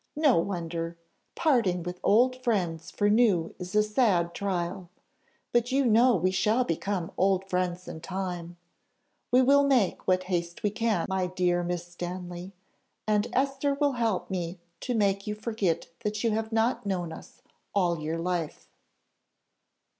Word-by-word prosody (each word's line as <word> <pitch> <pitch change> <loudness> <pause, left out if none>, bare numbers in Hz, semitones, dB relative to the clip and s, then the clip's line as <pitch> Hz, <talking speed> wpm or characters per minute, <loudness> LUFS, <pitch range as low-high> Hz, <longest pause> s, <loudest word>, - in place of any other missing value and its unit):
no 295 - +4
wonder 170 -2 -3 0.4
parting 225 - +2
with 180 +1 -6
old 255 +4 +3
friends 180 -9 -1
for 205 - 0
new 205 -6 +3
is 180 +2 -6
a 210 - +5
sad 210 -6 +2
trial: 180 -2 -3 0.6
but 240 +1 +1
you 275 +1 +2
know 240 +2 +5
we 185 +1 +1
shall 215 +6 +2
become 180 -2 -2
old 190 0 +2
friends 180 -1 -2
in 160 - -7
time: 175 -2 -5 0.7
we 255 +1 +5
will 280 +2 +5
make 260 -9 +2
what 185 0 +3
haste 175 0 -3
we 210 - +2
can, 215 -5 0
my 190 -1 0
dear 180 -1 +1
Miss 175 0 -3
Stanley, 175 +1 -6 0.6
and 210 +1 +2
Esther 275 +2 +1
will 285 0 +2
help 230 -7 -1
me 175 -1 -3 0.2
to 250 - -2
make 200 -2 +1
you 210 - -2
forget 210 -6 -1
that 210 0 -3
you 230 - +2
have 220 +1 -2
not 225 +3 +1
known 180 -5 -2
us - - -13 0.3
all 175 -4 +2
your 155 +2 -3
life." 170 -2 -3
190 Hz, 155 wpm, -28 LUFS, 175-225 Hz, 0.7 s, a